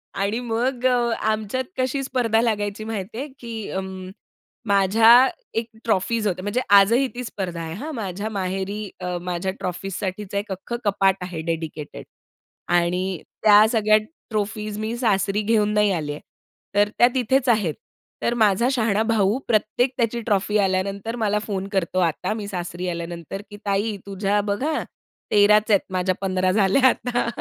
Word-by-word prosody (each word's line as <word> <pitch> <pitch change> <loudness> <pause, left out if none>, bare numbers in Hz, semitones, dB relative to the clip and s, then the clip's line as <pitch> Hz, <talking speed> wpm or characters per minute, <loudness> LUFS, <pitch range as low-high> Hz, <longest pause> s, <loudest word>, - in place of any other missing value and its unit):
आणि 200 +4 -1
मग 245 +2 -1
अ, 250 -1 +4 0.2
आमच्यात 220 +3 -1
कशी 260 +1 0
स्पर्धा 240 -4 +1
लागायची 210 -2 -1
माहिती 215 -1 -5
आहे, 275 +4 -3
की 225 -3 -6
अं, 190 0 -3 0.8
माझ्या 220 +6 +6 0.3
एक 225 - -6 0.2
ट्रॉफीज 220 +1 +1
होते. 185 -2 -2
म्हणजे 205 +6 -1
आजही 205 +7 +6
ती 250 - -4
स्पर्धा 185 -7 -5
आहे, 160 -1 -5
हां. 290 - -6
माझ्या 200 -1 -4
माहेरी 195 +1 -3
अ, 180 0 -3
माझ्या 180 +1 -2
ट्रॉफीजसाठीच 190 +2 -4
एक 200 +1 -2
अख्खं 195 +5 -4
कपाट 195 -1 +3
आहे 180 -3 -5
डेडिकेटेड. 160 -2 -6 0.6
आणि 175 +1 +2 0.4
त्या 210 0 +8
सगळ्या 215 -2 +4 0.3
ट्रॉफीज 215 -1 -3
मी 220 +2 -2
सासरी 205 -3 +1
घेऊन 210 -1 +2
नाही 210 -1 +3
आलीये. 150 -3 -3 0.6
तर 205 0 +4
त्या 240 - +7
तिथेच 260 +1 +2
आहेत. 210 -9 +2 0.5
तर 235 - +1
माझा 215 +2 +4
शहाणा 220 -5 +1
भाऊ 220 -1 +2
प्रत्येक 230 +3 +1
त्याची 235 -1 0
ट्रॉफी 210 0 +1
आल्यानंतर 195 +3 -1
मला 210 0 +1
फोन 195 -2 -3
करतो, 185 -2 0
आता 175 +4 0
मी 215 -2 -5
सासरी 180 -2 -4
आल्यानंतर, 170 +2 -5
की 205 - -10
"ताई 205 +1 0
तुझ्या 200 +1 0
बघ 200 +1 -2
हां, 310 +1 0 0.5
13 210 0 +6
च 215 +1 -5
आहेत, 200 - +5
माझ्या 185 0 0
15 185 -1 +1
झाल्या 205 +6 +4
आता." 245 -1 -1
205 Hz, 155 wpm, -23 LUFS, 190-225 Hz, 0.8 s, त्या